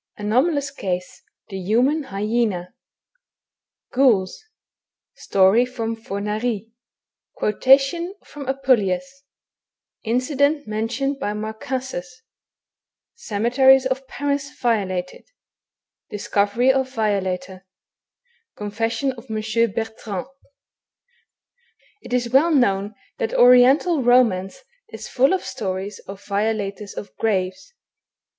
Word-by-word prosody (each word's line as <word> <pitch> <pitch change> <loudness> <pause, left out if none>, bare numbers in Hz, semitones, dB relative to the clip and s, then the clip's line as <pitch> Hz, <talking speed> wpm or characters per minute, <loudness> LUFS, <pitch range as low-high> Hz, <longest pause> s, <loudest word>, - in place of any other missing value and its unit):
ANOMALOUS 275 +7 +1
CASE. 185 -9 -4
— - - -47
THE 195 -2 -5
HUMAN 255 - +1
HY 200 -1 -4
ZENA, 215 -6 -1 1.2
Ghouls 240 - +2 0.4
— - - -68
Story 195 +5 +5
from 230 -3 -4
Fornari 215 +1 -3 0.3
— - - -31
Qaotation 275 - +3
fixnn 285 -2 -9
Apaleius 255 -9 +2 0.6
— - - -60
Incident 285 +3 +1
mentioned 245 +6 -2
by 205 - -2
Marcassus— 220 +1 -5 0.9
Cemeteries 260 - +3
of 260 0 -2
Paris 280 0 -2
violated— 190 -6 -1 0.8
Discoveiy 205 +4 +1
of 265 -1 0
Violator 190 -4 -2 0.4
— 475 -1 -44
Confession 225 +6 -2
of 250 0 -13
M. 220 +1 0
Bertrand. 220 -3 -4 1.8
It - - -12
is 245 -1 0
well 290 +6 +5
known 205 -8 +1 0.2
that 225 - -2
Oriental 255 +6 +5
romance 235 - +2 0.3
is - - -8
full 270 +3 +3
of 380 - -1
stories 195 -4 -4
of 195 0 -10
violators 205 -1 -2
of 200 - -8
graves. 200 - -2
225 Hz, 100 wpm, -22 LUFS, 200-265 Hz, 1.8 s, Story